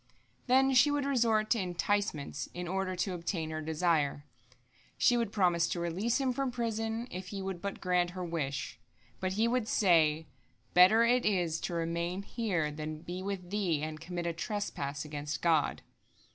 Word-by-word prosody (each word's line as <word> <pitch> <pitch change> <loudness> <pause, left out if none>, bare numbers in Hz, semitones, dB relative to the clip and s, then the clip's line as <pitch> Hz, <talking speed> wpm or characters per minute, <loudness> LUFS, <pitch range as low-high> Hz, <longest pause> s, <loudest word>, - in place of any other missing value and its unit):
" - - -37
Then 265 +2 +4
she 255 +3 +6
would 290 -1 0
resort 225 -5 +2
to 235 - +3
enticements 180 -5 -1
in 175 0 -4
order 190 +1 -1
to 185 +1 -1
obtain 170 -2 -3
her 155 0 -3
desire. 155 -3 0 0.7
She 245 - +4
would 235 -4 0
promise 175 -4 +2
to 175 - -2
release 185 - 0
him 265 -2 +1
from 275 0 -1
prison, 225 -1 -2
if 185 +1 -6
he 200 +1 -5
would 190 -2 -4
but 200 0 -4
grant 180 -1 +1
her 180 - -3
wish. 150 -4 -3 0.4
But 185 0 -1
he 220 +4 +2
would 240 -2 0
say, 160 -7 +3 0.5
"Better 185 +6 +7
it 245 +1 +3
is 175 -6 +1
to 175 - -3
remain 170 +3 -2
here 190 -9 -1
than 155 +1 -6
be 180 +1 -5
with 190 -2 -5
thee 180 -8 0
and 155 0 -5
commit 175 +1 -4
a 170 - -1
trespass 160 -7 -3
against 150 0 -5
God." 165 -3 +2
180 Hz, 175 wpm, -31 LUFS, 165-215 Hz, 0.7 s, Better